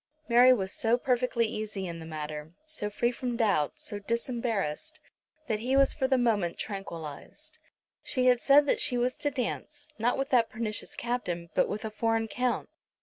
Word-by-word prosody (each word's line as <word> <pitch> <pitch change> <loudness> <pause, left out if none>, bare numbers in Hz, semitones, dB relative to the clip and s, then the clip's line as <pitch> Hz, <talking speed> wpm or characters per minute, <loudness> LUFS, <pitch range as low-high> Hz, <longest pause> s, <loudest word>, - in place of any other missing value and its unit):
Mary 245 +2 +7
was 190 -6 +1
so 230 +1 +2
perfectly 250 -2 +1
easy 215 -3 -4
in 170 -2 -5
the 160 - -8
matter, 155 0 -6
so 310 -10 -2
free 235 +3 0
from 245 -1 -3
doubt, 200 - +2
so 205 - -4
disembarrassed, 235 - -2 0.5
that 215 -6 -1
he 250 +4 0
was 275 0 +5
for 265 -3 0
the 265 -1 +3
moment 210 -8 +1
tranquillised. 170 -8 -7 0.4
She 255 -2 0
had 250 -1 +5
said 285 +1 +6
that - - +2
she 245 - +2
was 250 +1 +1
to 290 - 0
dance, 285 +2 -4
not 240 +3 +1
with 270 +1 -2
that 240 -3 +4
pernicious 220 -2 -3
Captain, 175 -9 -3
but - - +2
with 210 +2 -4
a 220 - -4
foreign 225 +1 0
Count. 250 +2 -1
230 Hz, 180 wpm, -29 LUFS, 200-250 Hz, 0.5 s, Mary